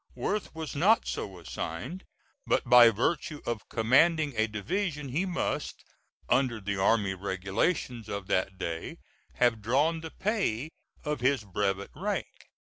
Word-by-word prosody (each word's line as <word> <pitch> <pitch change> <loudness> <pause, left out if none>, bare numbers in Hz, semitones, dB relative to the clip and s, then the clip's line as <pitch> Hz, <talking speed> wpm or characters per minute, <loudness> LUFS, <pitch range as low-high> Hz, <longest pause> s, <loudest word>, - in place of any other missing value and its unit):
Worth 210 -5 -2
was 160 -2 -5
not 205 +10 +4
so 95 -2 -4
assigned, 85 - -6 0.4
but - - +1
by 120 -1 +9
virtue 145 +7 -1
of 120 -3 -4
commanding 145 +6 +3
a 110 0 +2
division 150 - -2
he 165 +9 0
must, 180 -1 -2 0.4
under 125 -3 +2
the 100 -1 -3
army 100 0 +2
regulations 100 - -2
of 100 -1 -4
that 95 +1 0
day, 85 -3 -4 0.4
have 120 -3 +2
drawn 145 +9 +2
the 160 - -6
pay 160 - -1 0.3
of 150 -2 -1
his 130 -1 +2
brevet 100 0 -2
rank. - - -4
120 Hz, 135 wpm, -29 LUFS, 100-155 Hz, 0.4 s, by